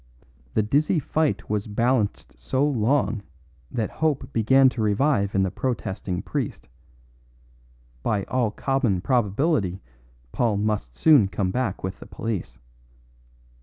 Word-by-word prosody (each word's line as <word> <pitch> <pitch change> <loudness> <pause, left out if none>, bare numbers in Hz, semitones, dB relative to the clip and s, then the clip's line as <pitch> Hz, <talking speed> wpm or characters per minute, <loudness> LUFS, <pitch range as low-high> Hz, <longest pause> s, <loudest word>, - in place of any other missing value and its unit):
The 110 - +2
dizzy 145 - +2
fight 155 +1 0
was 105 0 -2
balanced 115 0 0
so 130 - 0
long 115 -4 +1 0.5
that 115 -4 -2
hope 150 -4 -1
began 130 +4 +5
to 125 -3 -4
revive 105 -1 +1
in 95 - +3
the 95 - -1
protesting 95 -7 -3
priest; - - -4 1.3
by 105 - 0
all 120 0 0
common 120 -4 0
probability 110 - +1 0.5
Paul 115 -4 +1
must 100 - -2
soon 145 - +5
come 95 -1 -1
back 125 -4 -2
with 95 0 -4
the - - -11
police. 110 -5 -4
110 Hz, 125 wpm, -24 LUFS, 100-135 Hz, 1.3 s, began